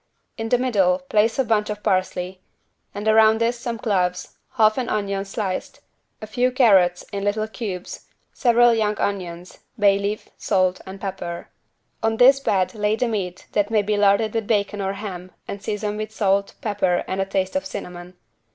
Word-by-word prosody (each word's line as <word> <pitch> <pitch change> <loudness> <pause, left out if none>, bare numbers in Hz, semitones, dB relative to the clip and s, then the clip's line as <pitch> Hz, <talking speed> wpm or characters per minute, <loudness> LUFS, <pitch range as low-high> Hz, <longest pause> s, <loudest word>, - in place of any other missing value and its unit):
In 225 -1 -4
the 245 - +4
middle 200 -8 +2
place 210 +6 +1
a 265 - +3
bunch 215 -3 +1
of 210 0 -5
parsley, 185 -2 -1 0.5
and 205 +1 -5
around 220 0 +5
this 235 +1 0
some 235 -1 -4
cloves, 185 -6 -1 0.2
half 215 -1 +3
an 250 - -2
onion 200 -1 -1
sliced, 195 -2 -4 0.4
a - - -3
few 245 +4 0
carrots 195 -9 +4
in 200 0 -3
little 215 +2 0
cubes 200 -5 -6 0.3
several 240 -1 +4
young 210 -2 0
onions, 180 -3 -4 0.2
bay 200 -2 +4
leaf, 205 +1 -3
salt, 185 -2 +1
and 190 +1 -8
pepper. 175 -3 -6 0.5
On 225 0 0
this 265 +3 +7
bed 190 -8 0
lay 210 0 0
the 250 +2 0
meat 185 -5 -4
that 205 0 +1
may 215 -2 +2
be 210 +1 0
larded 205 +1 +3
with 225 -2 -2
bacon 205 -2 0
or 195 0 -1
ham 185 -3 -7
and 200 - -6
seasoned 210 0 -3
with 215 0 -4
salt, 200 -2 0
pepper 195 -5 0
and 190 +1 -2
a - - 0
taste 190 +1 -2
of 285 - 0
cinnamon. 180 -2 -8
205 Hz, 180 wpm, -22 LUFS, 190-220 Hz, 0.5 s, this